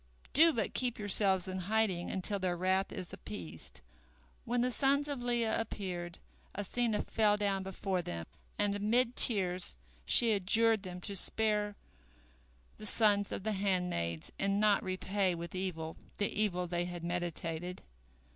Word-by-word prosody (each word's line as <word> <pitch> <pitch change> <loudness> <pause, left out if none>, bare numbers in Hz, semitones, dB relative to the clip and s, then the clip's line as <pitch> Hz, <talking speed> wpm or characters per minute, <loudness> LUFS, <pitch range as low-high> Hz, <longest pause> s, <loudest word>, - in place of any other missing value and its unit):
Do 325 +4 +6
but 225 -8 -2
keep 250 -2 -1
yourselves 195 -2 +4
in 185 0 -4
hiding 190 -2 0
until 195 +2 -3
their 180 -2 -1
wrath 190 +2 0
is 180 - -7
appeased." 210 - -9 0.6
When 240 0 0
the 250 +1 +1
sons 280 +3 +2
of 285 -4 -4
Leah 235 -2 0
appeared, 180 -5 -6 0.4
Asenath 215 +2 -2
fell 210 -2 +3
down 200 -2 -1
before 190 -1 -3
them, 85 - -6 0.3
and 205 -1 +1
amid 230 +4 +2
tears 185 - +4 0.3
she 230 - +4
adjured 220 +2 +3
them 180 -2 -8
to 200 +2 +1
spare 210 +1 +3 1.0
the 215 - -5
sons 205 -2 +2
of - - -5
the 220 - -1
handmaids 180 - -2
and 195 +1 0
not 210 -1 +3
repay 185 0 -1
with 170 0 -7
evil 170 -4 -4 0.2
the 205 - 0
evil 185 -4 0
they 175 0 -2
had 175 -1 -7
meditated. 175 0 -4
195 Hz, 145 wpm, -32 LUFS, 180-220 Hz, 1.0 s, Do